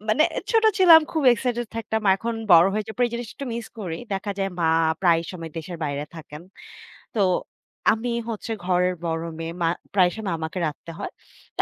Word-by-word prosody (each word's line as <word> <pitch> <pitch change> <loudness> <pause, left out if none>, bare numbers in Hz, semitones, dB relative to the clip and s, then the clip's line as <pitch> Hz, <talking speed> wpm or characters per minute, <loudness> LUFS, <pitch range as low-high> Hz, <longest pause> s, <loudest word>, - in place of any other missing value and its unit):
মানে 305 +8 +4 0.3
ছোট 450 -1 +3
ছিলাম 335 -4 +9
খুব 315 - 0
এক্সাইটেড 240 0 -2
থাকতাম, 220 0 -2
এখন 230 +4 -3 0.2
বড় 170 +1 +8
হয়ে 215 +1 -1
যের 220 - -7
পর 250 - +4
জিনিসটা 235 -1 -5
একটু 275 - -6
মিস 235 -1 -5
করি। 170 -5 -4 0.2
দেখা 200 +2 -3
যায় 195 0 -1
মা 165 - +3 0.3
প্রায় 170 -3 +4
সময় 165 -3 -7
দেশের 170 +2 -6
বাইরে 145 0 -2
থাকেন, 155 -1 -10 0.8
তো - - +3 0.7
আমি 230 +2 -3 0.2
হচ্ছে 225 +1 -5
ঘরের 180 0 +2
বড় 165 0 -1 0.2
মেয়ে, 165 0 -4
মা 165 - +3 0.2
প্রায়শই 185 +2 +2 0.2
আমাকে 160 +3 -5
রাঁধতে 155 +2 -6
হয়। - - -5 0.5
তা - - +3
195 Hz, 180 wpm, -24 LUFS, 165-230 Hz, 0.8 s, ছিলাম